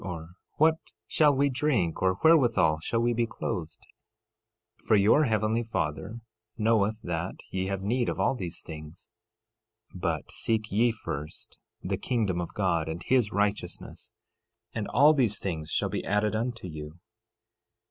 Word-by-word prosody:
or, 85 -3 -6 0.2
What 160 +1 +3 0.3
shall 150 -2 +3
we 140 +1 +2
drink? 125 - 0
or, 95 0 +3
Wherewithal 120 - +4
shall 115 +8 -1
we 120 0 +2
be 115 0 0
clothed? 85 -8 -4 1.1
13:32 - - -20
For 110 - +5
your 105 +10 +5
heavenly 110 0 +1
Father 110 0 -3 0.4
knoweth 110 -1 +1
that 85 +1 -3 0.2
ye 95 0 -2
have 95 -1 -3
need 120 +4 0
of - - -3
all - - +2
these 90 -8 -5
things. 80 +1 -10 0.9
13:33 - - -10
But - - -2
seek 110 -1 -1
ye 115 +4 +3
first 80 -8 -7 0.2
the - - -1
kingdom 105 -8 -1
of 85 - -6
God 85 -5 0
and 80 +2 -5
his 125 -5 +2
righteousness, 105 0 -2 0.6
and 110 -3 -3
all 145 +6 +6
these 120 -8 +2
things 80 -5 -4
shall - - 0
be - - -3
added 105 +2 +1
unto 115 -3 -3
you. 80 0 -8
105 Hz, 155 wpm, -28 LUFS, 85-120 Hz, 1.1 s, all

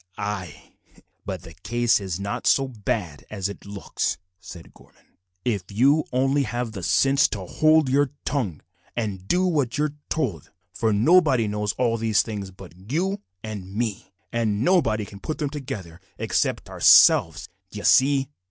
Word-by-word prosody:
"Ay, 95 -8 -6 0.5
but - - -4
the - - -12
case 120 -1 +1
is 95 -3 -4
not 100 +1 -3
so 135 -1 +3
bad 105 - -4
as 100 -3 -3
it 100 0 -10
looks," 100 -1 -3 0.2
said 85 0 -12
Gorman, - - -22 0.4
"if 105 -7 -1
you 140 +9 +3
only 135 +3 +2
have 120 -1 -3
the 100 -3 -7
sense 135 - +3
to 100 -4 -5
hold 155 - +3
your 140 +1 +2 0.2
tongue 105 - -2 0.3
and 100 -5 -4
do 180 - +2
what 145 -9 0
you 150 - +1
are 150 -1 -1 0.2
told; 115 - -2 0.2
for 110 -1 0
nobody 130 - +4
knows 105 -1 -2
all 120 -2 0
these 110 -2 +2
things 105 -4 -6
but 95 -1 -13 0.2
you 190 +6 -1 0.2
and 100 -3 -7
me, 110 -3 -3 0.2
and 110 -2 0
nobody 115 - +2
can 100 0 -12
put 155 - -4
them 145 -3 -2
together 95 - -7 0.2
except - - -1
ourselves - - +5 0.2
d'ye - - -8
see?" 135 0 +4
115 Hz, 160 wpm, -24 LUFS, 100-140 Hz, 0.5 s, ourselves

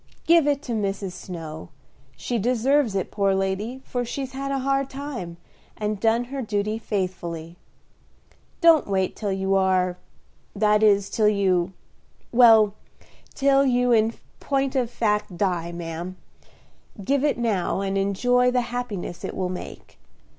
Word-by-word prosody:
Give 330 -3 +5
it 285 -1 +1
to 255 - -6
Mrs. 200 -3 -2
Snow; 165 -3 -8 0.5
she 240 -2 -2
deserves 250 +1 +2
it, 190 - -2
poor 200 -2 +1
lady, 200 +7 -2
for 245 -1 -2
she's 260 +2 -5
had 275 +1 -4
a 275 - 0
hard 275 0 0
time, 260 -12 -6 0.4
and 210 -1 -2
done 225 +2 +2
her 270 +2 -5
duty 215 -1 -2
faithfully. 175 -6 -4 1.1
Don't 330 -3 +6
wait 190 -2 0
till 205 -3 -3
you 190 0 0
are 185 -2 +2 0.6
that 210 0 +3
is, 200 -2 +4
till 215 -2 +2
you 190 -3 +1 0.6
well, 225 -4 +6 0.6
till 275 0 +4
you 250 -2 +2
in 225 0 +3 0.2
point 275 -1 -1
of 250 -3 +1
fact 210 -6 -1
die, 175 -3 -1
ma'am. 170 +2 -6 0.9
Give 275 +4 +1
it 295 - +1
now, 205 -6 0
and 195 0 -2
enjoy 245 +6 +2
the 250 0 +1
happiness 215 -8 -4
it - - -5
will 185 -1 -2
make. 180 - -9
210 Hz, 145 wpm, -24 LUFS, 190-250 Hz, 1.1 s, Don't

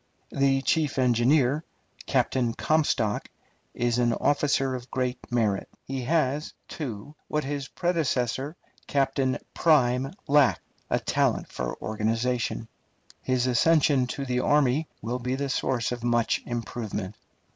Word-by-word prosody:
The 135 -1 +2
chief 150 -3 +1
engineer, 130 +4 +3 0.4
Captain 120 -3 +1
Comstock, 145 -9 +1 0.5
is 120 0 +1
an 120 -1 +3
officer 140 0 +1
of 125 -1 -6
great 125 -1 -1
merit. 110 -5 0 0.2
He 135 -1 -3
has, 150 0 0
too, 135 -2 -6
what 150 0 -1
his 140 0 -3
predecessor, 145 -5 -1 0.3
Captain 135 -1 +1 0.2
Prime, 135 -4 +3 0.2
lacked, 145 -2 +4 0.3
a - - +2
talent - - 0
for - - -4
organization. 115 +2 -1 0.5
His 130 -1 +1
accession 135 +1 +3
to 140 +2 -4
the 125 -1 0
army 145 +2 +2 0.2
will 120 +3 -2
be 125 +1 -2
the 140 +1 -2
source 125 -3 0
of 120 -1 -4
much 120 -1 +1
improvement. 110 -4 -4
130 Hz, 125 wpm, -26 LUFS, 120-140 Hz, 0.5 s, lacked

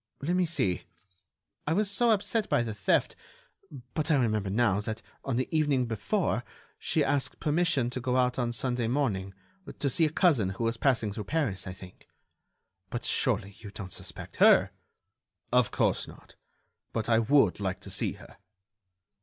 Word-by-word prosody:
Let 170 +6 -1
me 180 -1 +2
see!... 100 - 0 0.8
I 160 - +2
was 205 +4 +2
so 235 +4 +3
upset 215 +1 +1
by 120 - +2
the 115 -2 -4
theft... 100 - +1 0.8
but 155 +1 -2
I 155 - +5
remember 110 -6 +1
now 105 -1 +2
that, 110 +1 -5 0.2
on 135 - -2
the 130 +1 0
evening 145 -5 +2
before, 110 -5 -1 0.4
she - - +1
asked 140 -2 -1
permission 150 -5 +1
to 130 - -4
go 125 0 0
out 125 0 +1
on 120 -1 0
Sunday 120 0 -1
morning... 105 -8 -1 0.4
to 140 - 0
see 160 - +3
a - - +1
cousin 145 - +3
who - - -2
was 115 0 +1
passing 115 -5 +1
through 105 -1 -5
Paris, 135 -13 -1
I 95 - -5
think. 95 0 -14 0.8
But, 120 - -4
surely, 100 -5 0
you 105 - -9
don't 100 -2 -8
suspect - - -7
her?" - - +6 0.8
"Of 125 -4 +4
course - - +1
not... - - -14 0.6
but 110 - -2
I 115 -2 +4
would 115 -4 +3
like 95 -2 -2
to - - -9
see - - +2
her." - - -15
120 Hz, 170 wpm, -29 LUFS, 105-145 Hz, 0.8 s, her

